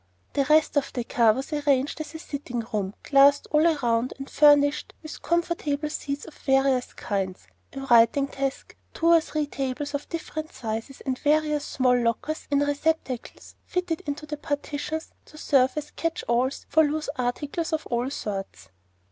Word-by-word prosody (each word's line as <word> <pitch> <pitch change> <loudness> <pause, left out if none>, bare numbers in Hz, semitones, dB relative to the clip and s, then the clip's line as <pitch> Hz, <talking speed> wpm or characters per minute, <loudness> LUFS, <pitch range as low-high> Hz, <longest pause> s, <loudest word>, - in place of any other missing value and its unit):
The 275 - +1
rest 305 +1 +3
of 275 -1 0
the 245 - -2
car 230 -1 +4
was 265 +6 -5
arranged 285 0 +1
as 310 - -8
a - - -3
sitting 280 -6 -5
room, 200 -2 -2
glassed 280 0 +5
all 305 +2 +4
around, 245 -6 +1
and 270 0 -7
furnished 290 -1 +4
with 310 - -8
comfortable 320 -3 -1
seats 280 -1 -4
of 320 - -11
various 270 -2 +1
kinds, 195 -3 -3 0.3
a 270 - -6
writing 240 +1 +5
desk, 275 -1 -4 0.2
two 335 - +2
or 335 - +6
three 310 -1 -2
tables 280 +1 -4
of 285 0 -4
different 315 -1 -5
sizes, 225 +3 -5
and 260 -2 -3
various 300 0 +1
small 255 -2 +2
lockers 245 +6 -1
and 285 0 +2
receptacles, 290 -4 -2
fitted 360 -3 -2
into 290 +1 -4
the 300 0 -5
partitions 295 +1 -4
to 305 - -15
serve 265 -4 +3
as 300 -1 -5
catch 330 0 -3
alls 250 +3 0
for 315 - +4
loose 305 0 -1
articles 290 +7 -2
of 315 -1 -1
all 240 +2 -1
sorts. 200 -8 -5
285 Hz, 165 wpm, -26 LUFS, 255-305 Hz, 0.3 s, or